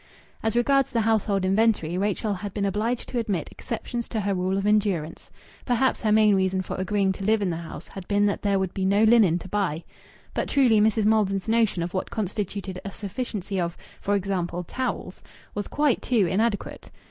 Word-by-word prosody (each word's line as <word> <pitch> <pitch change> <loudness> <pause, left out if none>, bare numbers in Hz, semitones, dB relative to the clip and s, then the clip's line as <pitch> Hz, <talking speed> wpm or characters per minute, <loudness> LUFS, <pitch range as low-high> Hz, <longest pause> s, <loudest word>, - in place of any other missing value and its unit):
As 220 +1 -1
regards 275 +2 +3
the 235 -4 0
household 210 -3 +1
inventory, 195 -4 +2
Rachel 205 +2 0
had 200 +1 -6
been 200 -1 0
obliged 215 +5 -1
to 245 - -1
admit 200 -8 -2
exceptions 235 0 -5
to 220 - -2
her 200 0 0
rule 185 +1 0
of 195 - -1
endurance. 200 -7 0 0.3
Perhaps 250 +1 +1
her 215 - +1
main 215 -1 +5
reason 190 -1 +1
for - - -5
agreeing 195 +1 +1
to 190 +1 -6
live 220 +2 +3
in 185 - 0
the 165 - -3
house 170 -1 -8
had 190 -2 -9
been 205 0 +2
that 200 - 0
there 200 -1 +2
would 190 -1 -1
be 190 - -2
no 200 +3 +3
linen 220 -7 +5
to 180 - -8
buy. 185 -5 -1 0.5
But - - -2
truly 245 -7 +4
Mrs. 220 0 +2
Maldon's 205 -3 +2
notion 220 -6 +2
of 175 - -5
what 185 - -2
constituted 200 -2 -4
a 200 - -4
sufficiency 200 -1 -4
of 170 0 -3 0.2
for 205 - +1
example 180 -3 -2
towels, 240 -2 -4 0.3
was 205 0 -3
quite 295 -4 +1
too 230 -6 +2
inadequate. 205 +4 -1
200 Hz, 195 wpm, -25 LUFS, 190-220 Hz, 0.5 s, main